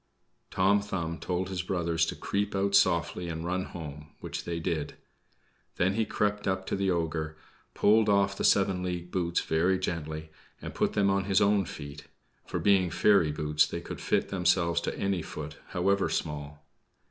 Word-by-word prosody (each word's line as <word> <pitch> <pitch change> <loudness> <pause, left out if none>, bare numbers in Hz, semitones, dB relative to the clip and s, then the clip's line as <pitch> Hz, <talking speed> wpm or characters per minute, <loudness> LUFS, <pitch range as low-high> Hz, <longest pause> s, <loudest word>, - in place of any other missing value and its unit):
Tom 100 +2 +3
Thumb 85 -5 -4
told 90 +1 -2
his 95 -2 -2
brothers 85 -3 0
to - - -3
creep 100 0 -2
out 100 +1 0
softly 85 -2 +2
and 80 0 -4
run 90 +1 -1
home; 75 -3 -8
which - - -6
they 85 -1 -3
did. 80 -3 -2 0.8
Then 95 +2 +2
he 110 +2 +1
crept 105 0 -1
up 95 0 -1
to - - -2
the 100 0 0
ogre, 80 -3 -1 0.4
pulled 110 +1 +4
off 100 -1 +3
the - - -4
seven 95 -2 +3
league 90 -1 -4
boots 85 -2 0
very 85 +4 +2
gently 80 -3 -4 0.3
and - - -7
put - - 0
them 100 -1 +3
on 95 0 +1
his 95 -1 +3
own 100 -1 +3
feet, 70 -2 -9 0.4
for - - -3
being 95 -3 +3
fairy 85 -2 +4
boots 75 0 +2
they - - -4
could - - -8
fit - - 0
themselves 90 -2 +2
to - - -3
any 100 -3 0
foot, 75 -1 -7
however 100 +2 +1
small. 75 -1 -4
90 Hz, 175 wpm, -29 LUFS, 80-100 Hz, 0.8 s, pulled